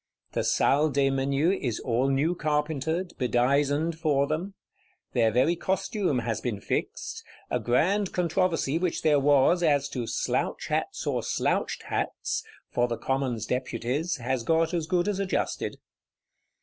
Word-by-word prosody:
The - - -1
Salle 150 +3 +3
des 135 -1 +2
Menus 140 +7 +1
is 120 -5 -2
all 125 +2 +1
new 140 +5 +2
carpentered, 155 +2 -1
bedizened 140 +6 +1
for 145 -4 +2
them; 170 +7 -3 0.6
their 115 -2 +3
very 130 +9 +3
costume 190 - -1
has 115 -2 -2
been 115 -5 -2
fixed; - - -3 0.3
a - - +1
grand 190 +11 +1
controversy 170 -3 +1
which 180 -2 -1
there 150 -2 +4
was, 145 +5 +4
as 145 -4 +3
to 120 -4 -4
"slouch - - -1
hats - - -2
or - - 0
slouched - - -1
hats," - - -2 0.3
for 120 0 +2
the 120 -1 -3
Commons 130 -5 -1
Deputies, 125 +6 -1
has 125 0 -2
got 165 +6 +1
as 165 -3 -1
good 180 +1 +1
as 205 -2 -1
adjusted. 195 -1 -2
145 Hz, 145 wpm, -27 LUFS, 130-170 Hz, 0.6 s, there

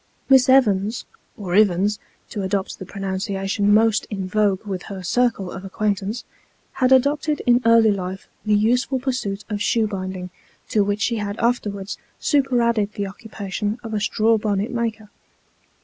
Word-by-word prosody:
Miss 265 -1 +6
Evans 220 -4 +3 0.3
(or 185 -4 -5
Ivins, 205 0 +3 0.3
to 205 - -3
adopt 190 0 -2
the 190 - -8
pronunciation 195 +1 -1
most 220 0 +3
in 195 -3 -4
vogue 205 0 +1
with 190 -3 -4
her 190 -2 -6
circle 225 -2 0
of 190 - -7
acquaintance) 205 +2 -2 0.5
had 255 -1 +1
adopted 285 +3 +3
iii 245 +1 +5
early 230 -1 +6
life 190 -1 -4 0.2
the 210 -1 +2
useful 245 +5 +2
pursuit 245 -7 -3
of 210 -2 -4
shoe 225 +1 +2
binding, 185 -3 -5 0.4
to 210 - +3
which 205 +1 -1
she 235 - +1
had 205 0 -3
afterwards 205 -5 -1 0.2
superadded 235 -7 +1
the 200 - -3
occupation 205 +1 -4
of 225 -1 -6
a 210 - 0
straw 220 +2 +2
bonnet 205 +1 -1
maker. 225 -3 -3
210 Hz, 150 wpm, -22 LUFS, 195-230 Hz, 0.5 s, Miss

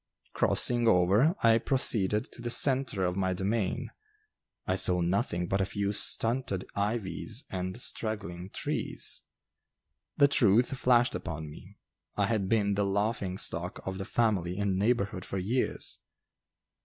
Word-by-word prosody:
Crossing 120 -1 +3
over, 105 - +4
I 115 0 +5
proceeded 105 -5 +2
to - - -5
the 120 - -3
centre 130 -5 +1
of 90 0 0
my 95 -1 0
domain; 100 +1 -2 0.7
I - - 0
saw 90 -1 +2
nothing 90 0 0
but 95 +2 0
a - - +1
few 100 +1 -2
stunted 115 -1 0
ivies 105 - -2
and 95 +3 -4
straggling 95 -7 -4
trees. - - -3 1.0
The 140 - +6
truth 120 -1 +4
flashed 125 -2 +3
upon 80 -2 -5
me. - - -14 0.4
I 100 - +1
had 100 -3 -1
been 105 -3 +2
the 100 +1 0
laughing 100 -1 -1
stock 85 -1 -3
of 95 0 -4
the 95 - -4
family 95 -7 0
and 100 -2 0
neighborhood 105 -1 0
for 95 - -5
years. 110 +8 -2
100 Hz, 140 wpm, -29 LUFS, 95-115 Hz, 1.0 s, The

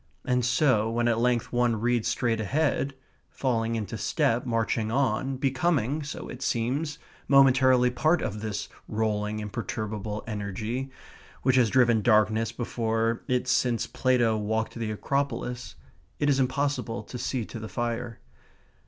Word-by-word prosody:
And 125 0 +1
so, 125 -4 +3
when 120 +1 0
at 115 -1 +2
length 120 0 +1
one 120 -2 +2
reads 120 0 +1
straight 115 -3 0
ahead, 140 +2 0 0.3
falling 115 -3 -1
into 110 -4 -4
step, 120 +3 +1
marching 115 -1 0
on, 130 +1 0
becoming 135 +1 +1
(so 145 - -6
it 125 - -8
seems) 135 +6 -1 0.3
momentarily 130 -2 +5
part 155 +7 +2
of 105 +1 -3
this 105 -2 -3 0.2
rolling, 105 -1 -1
imperturbable 105 0 -4
energy, 110 +5 -4 0.5
which 130 0 +3
has 120 -3 +4
driven 120 -3 +4
darkness 110 0 +3
before 115 -1 -1
it 125 0 0
since 125 -2 +2
Plato 125 -3 +2
walked 110 +1 -1
the 115 -2 -3
Acropolis, 125 -1 -2 0.4
it 145 0 +2
is 135 - +2
impossible 130 -2 -1
to 125 - -8
see 125 -1 -2
to 115 - -8
the 110 0 -7
fire. 120 +1 -3
120 Hz, 140 wpm, -27 LUFS, 110-130 Hz, 0.5 s, momentarily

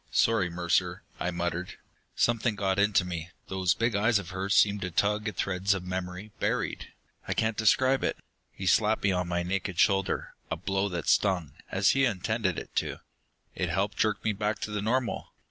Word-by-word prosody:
"Sorry, 110 -6 +2
Mercer," 85 0 0 0.2
I 90 - -1
muttered. 85 0 -3 0.4
"Something 115 -1 +2
got 95 -1 0
into 100 -2 +3
me. 85 -1 -5 0.2
Those 95 -3 +1
big 115 -1 0
eyes 110 +2 +3
of 95 -3 -5
hers 95 +2 -1
seemed 100 -1 +4
to 90 - -2
tug 105 +4 +1
at 105 - -3
threads 95 +1 +1
of 90 -1 -5
memory... 90 +2 -5
buried.... - - -1 0.4
I - - -1
can't 110 0 +1
describe 130 +5 +3
it...." - - 0 0.3
He 95 - -7
slapped 110 +3 +3
me 100 - +3
on 90 -1 0
my 85 0 -1
naked 90 0 -2
shoulder, 95 -1 +2 0.2
a - - -1
blow 95 +3 -1
that 85 -3 -4
stung, 90 -7 +2 0.2
as 95 +1 +3
he 135 - +2
had 120 -6 +3
intended 100 0 -1
it - - -7
to. - - 0 0.6
It - - -2
helped 100 +1 0
jerk 110 -1 0
me 110 - +1
back 105 +1 -1
to 105 - -3
the 105 -1 -2
normal. 120 +3 -1
100 Hz, 195 wpm, -28 LUFS, 90-105 Hz, 0.6 s, seemed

